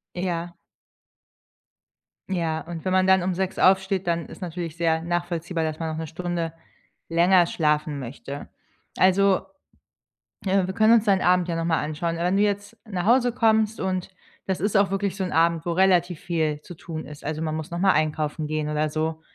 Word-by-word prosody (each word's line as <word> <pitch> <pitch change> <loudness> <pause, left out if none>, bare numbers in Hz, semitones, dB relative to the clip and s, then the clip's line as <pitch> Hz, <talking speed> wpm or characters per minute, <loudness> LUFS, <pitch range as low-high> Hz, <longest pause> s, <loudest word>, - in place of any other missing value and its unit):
Ja. 175 -1 -3 1.7
Ja, 165 -4 -1
und 170 0 -8
wenn 185 - 0
man 185 0 +3
dann 190 -1 +5
um 185 - 0
6 190 +1 -2
aufsteht, 190 0 +3
dann 170 -1 0
ist - - -12
natürlich 170 -2 -5
sehr 165 -1 +1
nachvollziehbar, 175 0 -2
dass 155 0 -3
man 165 - -2
noch 155 - -4
1 160 - -4
Stunde 170 0 -3 0.6
länger 175 +2 +5
schlafen 150 -3 0
möchte. 140 +3 -7 0.5
Also, 190 +1 +4 1.0
äh, 190 -1 +2
wir 190 - -3
können 220 0 +5
uns 225 -1 +4
deinen 195 -2 +3
Abend 180 0 +3
ja 170 - -2
nochmal 165 -1 0
anschauen. 155 +3 -2
Äh, 170 - -2
wenn 185 +2 +2
du 205 - +4
jetzt 205 +2 -2
nach 185 -3 -3
Hause 245 +1 +4
kommst 220 -2 +2
und 185 -1 -2 0.4
das 190 - -1
ist 205 +3 -1
auch 200 -1 +3
wirklich 195 0 -1
so 195 - -2
'n 180 - -3
Abend, 165 0 +2
wo 175 - -1
relativ 180 -2 +3
viel 155 -3 -1
zu 175 - -11
tun 160 0 -7
ist, 150 -1 -11
also, 155 +1 -3
man 155 -1 -2
muss 160 0 -6
nochmal 185 +3 +3
einkaufen 155 0 -1
gehen 155 0 -2
oder 150 0 0
so, 160 +1 -2
175 Hz, 190 wpm, -24 LUFS, 160-190 Hz, 1.7 s, dann